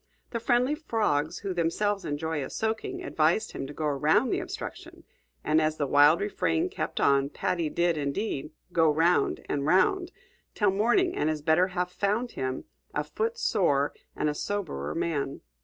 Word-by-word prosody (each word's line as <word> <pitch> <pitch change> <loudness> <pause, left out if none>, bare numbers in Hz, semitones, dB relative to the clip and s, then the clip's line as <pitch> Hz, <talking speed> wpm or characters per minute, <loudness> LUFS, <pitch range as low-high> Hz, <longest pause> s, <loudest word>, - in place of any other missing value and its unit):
The 230 - -2
friendly 245 +4 +2
frogs, 210 - 0
who 195 -2 -4
themselves 190 +4 0
enjoy 150 0 -2
a - - -6
soaking, 220 0 -3
advised 160 +7 +1
him 135 - -5
to 145 - -8
go 155 - -3
around 150 - +2
the - - +1
obstruction; - - -7 0.4
and 155 +1 +3
as 155 0 0
the 145 - 0
wild 145 +4 +5
refrain 180 -5 0
kept - - -4
on, 140 0 +3
Paddy 170 +1 -1
did 170 0 +1
indeed 145 +1 -2 0.2
"go 165 -2 +4
'round, 165 +4 +2
and 140 - -1
'round" 345 - +2 0.4
till 205 -3 +3
morning 240 - +2
and 155 - +1
his 155 -2 -3
better 160 +4 +4
half 180 -1 -2
found 215 +6 0
him, 130 0 -3 0.3
a - - +1
foot 460 +1 -2
sore 150 - +1 0.2
and 150 - 0
a 150 - +1
soberer 150 - -3
man. 140 -4 -2
165 Hz, 170 wpm, -28 LUFS, 150-210 Hz, 0.4 s, wild